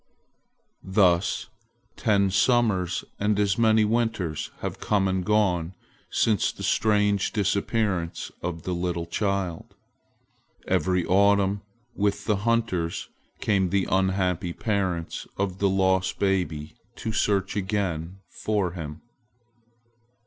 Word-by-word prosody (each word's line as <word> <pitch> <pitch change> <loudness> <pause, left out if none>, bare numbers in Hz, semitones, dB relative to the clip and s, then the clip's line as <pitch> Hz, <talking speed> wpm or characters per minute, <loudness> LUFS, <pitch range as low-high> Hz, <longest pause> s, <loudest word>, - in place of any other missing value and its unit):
Thus 95 -2 +2 0.4
ten 100 -2 +2
summers 105 -4 +2
and 105 0 +1
as 100 0 +1
many 110 -1 +4
winters 105 -9 -1
have - - -4
come 100 -2 +1
and 95 -1 0
gone 95 -4 +1 0.3
since 105 -5 +2
the - - -9
strange 105 -2 +2
disappearance 100 -3 -1
of 85 -2 -4
the 90 - -2
little 85 -1 -2
child. 95 -1 -2 0.9
Every 90 -2 +1
autumn 100 +1 +3 0.3
with 100 0 -1
the 105 -1 +2
hunters 95 -6 -1 0.3
came 95 -4 +2
the 95 +1 +1
unhappy 95 -2 +1
parents 95 -7 -2
of 95 -1 -2
the 100 - +3
lost 95 -1 +1
baby 80 -6 -1 0.2
to 110 - -4
search 100 -2 +1
again 95 -3 -2
for 105 -5 -1
him. 80 -3 -7
95 Hz, 110 wpm, -26 LUFS, 90-105 Hz, 0.9 s, many